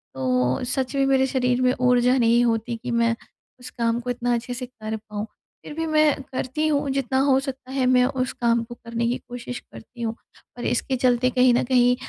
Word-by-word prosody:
तो 125 - 0
सच 255 +2 -2
में 275 0 +2
मेरे 265 -1 +3
शरीर 250 -2 +1
में 255 0 +3
ऊर्जा 250 +1 +4
नहीं 235 0 +4
होती 230 0 -1
कि 245 - -3
मैं, 230 0 +2 0.4
उस 250 - -9
काम 230 0 +1
को 250 - -6
इतना 245 0 0
अच्छे 235 +1 -4
से 250 +1 -5
कर 220 -3 -6
पाऊँ, 210 -1 -6 0.4
फ़िर - - -7
भी 325 +1 -2
मैं 305 -2 +3
करती 260 +4 -2
हूँ 285 -2 0
जितना 270 0 0
हो 270 -1 +4
सकता 265 -1 -7
है, 265 -1 0
मैं 250 0 +4
उस 255 -1 -1
काम 235 -1 +1
को 240 +1 -10
करने 235 0 -3
की 245 - 0
कोशिश 245 0 -6
करती 240 +2 -14
हूँ। 225 -1 -2 0.4
और 240 - -5
इसके 260 +2 0
चलते 250 0 +2
कहीं 250 0 +4
न 240 - +2
कहीं, 245 -1 +4
250 Hz, 215 wpm, -23 LUFS, 235-260 Hz, 0.4 s, ऊर्जा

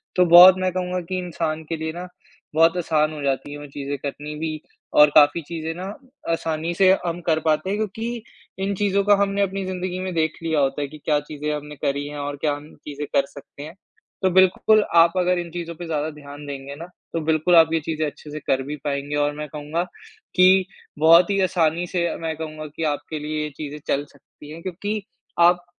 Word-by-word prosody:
तो 180 - +5
बहुत 175 +2 +10
मैं 185 0 0
कहूँगा 180 0 -2
कि 185 - -1
इंसान 160 -3 -3
के 165 - -1
लिए 160 0 -3
ना 175 +2 -7 0.5
बहुत 165 +2 +4
आसान 155 -3 +1
हो 150 - -7
जाती 140 +1 -1
है 145 - -6
वो 145 - -9
चीज़ें 140 0 -5
करनी 145 +2 -6
भी 155 -1 -3 0.4
और 150 0 +8
काफ़ी 150 +2 +6
चीज़ें 165 -1 -4
ना 180 +2 -6 0.5
आसानी 165 0 -2
से 185 +1 +5
हम 170 0 -2
कर 160 -1 +3
पाते 155 +4 +1
हैं 200 - -1
क्योंकि 225 +2 -4 0.4
इन 200 +1 0
चीज़ों 200 0 +1
को 205 +1 +5
हमने 200 0 0
अपनी 195 0 -1
ज़िंदगी 185 0 -4
में 185 -1 -4
देख 160 -1 +1
लिया 160 -2 +1
होता 135 +1 0
है 145 - -2
कि 155 - -12
क्या 150 -1 +2
चीज़ें 150 0 -5
हमने 150 0 -8
करी 140 +1 -2
हैं 145 0 -7
और 145 0 -4
क्या 150 - +1
हम 145 +1 -12
चीज़ें 150 0 -5
कर 140 - +4
सकते 140 0 -12
हैं। 155 +2 -9 0.5
तो 190 - +4
बिल्कुल 190 +4 +4
आप 170 0 +6
अगर 180 0 +2
इन 175 -1 -5
चीज़ों 170 -1 -6
पे 175 - -7
ज़्यादा 155 -1 -1
ध्यान 145 -1 -11
देंगे 140 0 -7
ना, 165 +4 -8 0.3
तो 165 - -1
बिल्कुल 160 +2 +3
आप 165 -1 +6
ये 165 - +2
चीज़ें 155 0 -2
अच्छे 150 +1 -10
से 155 - -5
कर 135 -2 0
भी 145 +2 -4
पाएँगे 140 0 -2
और 145 0 +1
मैं 150 - -5
कहूँगा 150 +3 -3 0.5
कि 185 +1 +5 0.3
बहुत 165 +3 +6
ही 200 -1 +1
आसानी 175 -2 +1
से 175 -1 -1 0.2
मैं 160 -1 -2
कहूँगा 155 -1 -6
कि 165 - -4
आपके 150 +2 -6
लिए 150 0 -3
चीज़ें 150 -1 -6
चल 145 +1 0
सकती 145 +1 -16
हैं 165 +2 -9
क्योंकि 205 +4 -3 0.4
आप 175 +1 +4
160 Hz, 215 wpm, -23 LUFS, 150-180 Hz, 0.5 s, बहुत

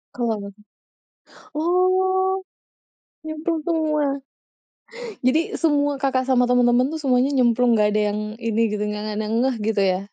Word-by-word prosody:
Kenapa? 220 -4 -2 1.1
Oh, 375 +3 +1 0.8
nyemplung 315 +1 -3
semua? 310 -3 0 1.2
Jadi 310 +7 +1
semua 290 -3 +1
Kakak 265 -1 0
sama 250 -1 +3
temen-temen 245 +1 +3
tuh 320 - -4
semuanya 260 0 +2
nyemplung, 245 -1 +3
nggak 210 -1 +3
ada 215 - +2
yang 210 - -3 0.2
ini 230 0 0
gitu, 210 0 -2
nggak 210 0 -4
ada 215 - -2
yang 220 +2 -2
ngeh, 265 -2 +1
gitu 215 -2 0
ya? 185 -1 +1
260 Hz, 135 wpm, -22 LUFS, 225-315 Hz, 1.2 s, sama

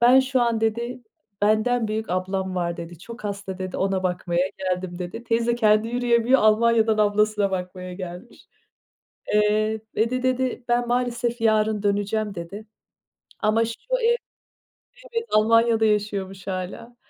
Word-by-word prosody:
"Ben 250 +2 +7
şu 260 0 0
an" 235 -2 +1
dedi, 235 +3 -2 0.4
"Benden 220 +2 +2
büyük 215 -2 -3
ablam 190 +1 -2
var." 170 -1 -1
dedi. 170 -1 -8
"Çok 235 +3 -11
hasta." 200 -2 -5
dedi, 185 -1 -4
"Ona 190 -1 0
bakmaya 180 0 0
geldim." 185 -1 -3
dedi. 180 +6 -6
Teyze 235 +1 +1
kendi 215 -1 +3
yürüyemiyor 245 +1 +3
Almanya'dan 220 0 +4
ablasına 210 -1 +2
bakmaya 180 0 -5
gelmiş. 180 +4 -9 0.9
Eee, 215 +1 +2
"ve 225 +2 +2
de" 255 +1 -2
dedi, 255 -1 0
"Ben 240 0 +1
maalesef 240 -1 -1
yarın 215 -1 +2
döneceğim." 205 0 0
dedi. 185 +5 -7 0.8
Ama 220 +1 +2
şu 230 0 -6 0.2
ev 475 +1 +4 1.0
Evet, 460 0 0
Almanya'da 225 +1 +4
yaşıyormuş 200 -3 -1
hâlâ 195 +5 -5
215 Hz, 135 wpm, -24 LUFS, 190-235 Hz, 1.0 s, Ben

